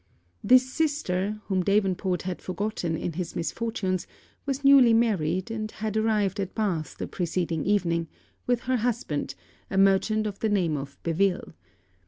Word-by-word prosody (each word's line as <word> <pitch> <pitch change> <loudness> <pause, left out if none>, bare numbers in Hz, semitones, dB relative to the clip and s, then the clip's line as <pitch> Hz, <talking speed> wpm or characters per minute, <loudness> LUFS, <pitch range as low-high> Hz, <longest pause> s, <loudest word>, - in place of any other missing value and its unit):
This 255 +1 +6
sister, 215 - -1
whom 190 -2 0
Davenport 190 -2 +1
had 185 -1 -4
forgotten 185 -4 -2
in 170 - -3
his 175 0 -5
misfortunes, 190 -1 -2 0.4
was 275 0 -2
newly 275 -4 +7
married; 200 -4 +1
and 215 -1 -3
had 215 0 -4
arrived 210 -3 +1
at 190 -2 -3
Bath 175 -9 -2
the - - -3
preceding 170 -3 -2
evening, 170 -5 +1 0.4
with 245 -1 +1
her 255 0 0
husband, 230 - -2 0.3
a 190 - -2
merchant 195 +3 +3
of 205 -2 -4
the 220 - 0
name 180 -7 +1
of 140 0 -6
Beville. 175 - 0
195 Hz, 150 wpm, -26 LUFS, 175-220 Hz, 0.4 s, newly